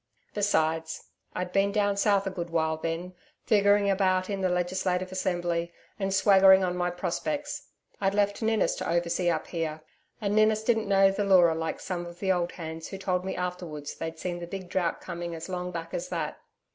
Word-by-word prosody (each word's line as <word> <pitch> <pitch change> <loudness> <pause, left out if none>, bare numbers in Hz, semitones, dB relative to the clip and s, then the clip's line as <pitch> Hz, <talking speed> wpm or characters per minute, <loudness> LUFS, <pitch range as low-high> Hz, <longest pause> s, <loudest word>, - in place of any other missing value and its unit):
Besides, 160 -6 0 0.3
I'd 180 0 -3
been 195 +1 +2
down 205 -1 +1
south 200 -1 +2
a 190 - -2
good 175 -2 -5
while, 160 -1 +1
then, 165 +3 -4 0.3
figuring 205 -1 +4
about 185 -1 +2
in 195 -1 -2
the 185 - +2
Legislative 180 +1 -1
Assembly 175 -2 -1 0.3
and 195 -1 -1
swaggering 190 -1 +6
on 180 -1 0
my 180 0 0
prospects. 195 - -3 0.3
I'd 195 0 +1
left 205 +1 +1
Ninnis 220 -1 +2
to - - -3
oversee 170 +1 +1
up 160 -2 -1
here, 160 -2 -3 0.4
and 205 -1 -1
Ninnis 215 0 +4
didn't 220 -3 +1
know 195 0 +5
the 205 +1 -1
Leura 180 -4 +5
like 160 0 -3
some 175 -2 -4
of 170 0 -10
the 190 +1 0
old 175 -1 0
hands, 160 -1 -6
who 195 - -7
told 185 -2 -1
me 190 - -3
afterwards 175 -5 -4
they'd 165 0 -6
seen 175 +1 -4
the 170 - -6
big 185 0 -7
drought 175 -2 -1
coming 170 0 -5
as 165 +3 -7
long 180 -1 -3
back 165 -1 -6
as 175 - -3
that. 165 -4 -3
180 Hz, 195 wpm, -28 LUFS, 170-195 Hz, 0.4 s, swaggering